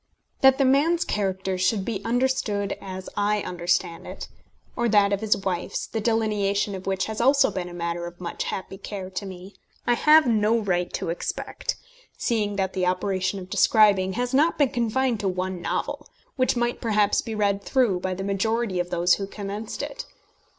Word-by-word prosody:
] - - -42
That 265 0 +6
the 275 - +3
man's 315 +7 +3
character 190 -2 -1
should 190 +1 +1
be 205 -3 -3
understood 230 -4 0
as 190 -1 -7
I 205 0 +1
understand 175 -1 -1
it - - -8 0.5
or 235 0 +1
that 205 -1 +4
of 200 - -1
his 220 -1 +2
wife's, 190 -3 -3
the 225 - -4
delineation 210 -3 +1
of 190 0 -7
which 190 -1 0
has 220 +1 -4
also 270 +2 +4
been 180 -2 -4
a - - -10
matter 170 0 -3
of 175 0 -11
much 175 -2 -4
happy 190 0 -5
care 195 -2 -6
to 190 +2 -4
me 185 +1 -10 0.3
I 240 - +3
have 305 +5 +6
no 220 -1 +3
right 180 -5 0
to - - -3
expect, - - -4 0.4
seeing 210 -4 0
that 190 -1 -1
the 185 -1 0
operation 185 +1 0
of 185 -1 -7
describing 200 -4 +4
has 245 +3 -2
not 305 +5 +3
been 285 -3 +3
confined 240 -1 0
to 200 - -1
one 185 -1 -2
novel, - - -3 0.3
which 255 -2 +2
might 240 0 -1
perhaps 210 -2 +2
be 225 - -5
read 200 -1 +1
through 240 -9 +2
by 185 0 -2
the 190 - -5
majority 200 0 0
of 175 0 -2
those 175 0 +3
who 195 - -1
commenced 205 +2 -5
it. - - -6
200 Hz, 190 wpm, -25 LUFS, 185-230 Hz, 0.5 s, That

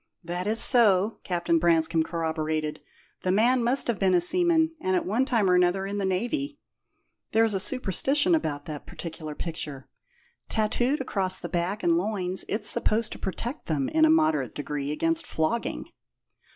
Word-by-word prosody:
"That 175 +3 -4
is 220 +2 +2
so," 215 -5 +5
Captain 170 -2 0
Branscome 165 -1 +2
corroborated. 160 -2 -3 0.4
"The 185 - 0
man 240 +5 +2
must 250 +3 +6
have 235 -4 -2
been 190 -2 +2
a - - +4
seaman, 325 - +2
and 185 0 0
at - - -1
one 225 +8 0
time 225 -7 +1
or 180 - +3
another 180 +2 +2
in 200 +1 -4
the 195 - -1
Navy. 280 +10 -2 0.8
There's 225 -1 +3
a 195 - -1
superstition 270 - +1
about 145 - -1
that 150 -2 -8
particular 160 -2 -8
picture: 150 -5 -5 0.6
tattooed 240 +6 0
across 190 -7 -2
the - - -7
back 180 +4 -2
and 170 -1 +3
loins 185 -2 -1
it's 210 +1 -1
supposed 220 0 +1
to - - -8
protect 235 - -5
them, 145 -5 -1
in 315 - +2
a 315 - +6
moderate 315 0 +1
degree, 145 0 -4
against 330 - -1
flogging." 160 +9 -2
190 Hz, 165 wpm, -26 LUFS, 170-240 Hz, 0.8 s, must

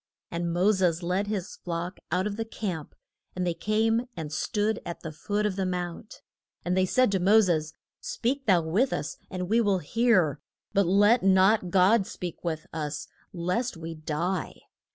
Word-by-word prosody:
And 170 0 -2
Mo 180 +5 +3
ses 180 -4 +1
led 185 +4 0
his 200 -4 -4
flock 175 +1 -4
out 180 +2 +1
of 210 -1 -2
the 225 - -2
camp, 190 -8 -5 0.4
and 180 0 -1
they 175 - +1
came 225 +5 +1
and 155 -2 -5
stood 210 +6 0
at 170 - -6
the 160 - -6
foot 205 +7 -2
of 200 -2 -1
the 195 - 0
mount. 180 +3 -5 0.4
And 180 +1 +1
they 185 0 +3
said 255 +2 +3
to 190 - +1
Mo 200 +5 +6
ses, 160 -5 0 0.2
Speak 270 +2 -2
thou 180 -4 +4
with 200 +12 +1
us, 145 - -3
and 180 -1 -4
we 225 +4 +3
will 200 -3 +2
hear; 185 - +2 0.3
but 200 -2 +3
let 205 +6 +5
not 190 +1 +4
God 195 +3 +4
speak 180 -6 -7
with 160 -3 -3
us 150 -2 -4 0.2
lest 180 +5 -2
we 165 0 -6
die. 160 +4 -3
185 Hz, 180 wpm, -27 LUFS, 170-210 Hz, 0.4 s, Mo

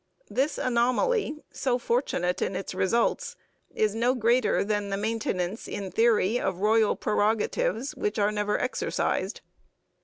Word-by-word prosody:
This 285 +3 0
anomaly, 285 - +1
so 255 -2 0
fortunate 230 -8 -1
in 185 - -1
its 195 - -4
results, 230 +5 0 0.3
is 215 -2 0
no 240 +3 +1
greater 235 -1 +2
than 205 0 -1
the 195 - -1
maintenance 215 -2 -2
in 195 -2 -5
theory 225 -1 +3
of 190 -2 -1
royal 215 +2 +3
prerogatives 215 +4 0
which 210 +1 -2
are 205 0 +2
never 210 0 0
exercised. 255 - -1
220 Hz, 130 wpm, -27 LUFS, 205-245 Hz, 0.3 s, theory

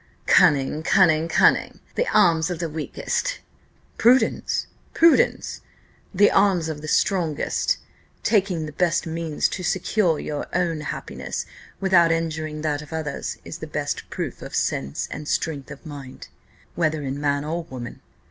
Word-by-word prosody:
"Cunning! 150 -4 +4
cunning! 160 -2 +4
cunning! 165 - +3
the - - 0
arms 170 -5 +4
of 175 - -3
the 170 0 -2
weakest." 160 - -3 0.6
"Prudence! 250 +3 +3 0.3
prudence! 330 0 +3 0.5
the 205 +1 +4
arms 190 -5 +3
of 150 -2 -5
the 155 - -7
strongest. 180 - +1 0.5
Taking 190 -7 +1
the 150 - -7
best 170 +2 +1
means 160 -2 -1
to 185 - -5
secure 180 -2 +1
our 150 -1 -3
own 170 -3 0
happiness 150 - -5 0.3
without 180 -4 +4
injuring 160 -2 -2
that 150 -2 -1
of 150 - -12
others 155 -3 -4
is - - -7
the - - -6
best - - -3
proof - - -5
of - - -7
sense 70 +1 -1
and 150 0 -6
strength 145 -5 -2
of 140 +3 -11
mind, 140 -4 -9 0.4
whether 155 -3 0
in 135 +1 -4
man 145 0 0
or 165 +2 -3
woman. 125 -5 -8
160 Hz, 145 wpm, -23 LUFS, 150-180 Hz, 0.6 s, Cunning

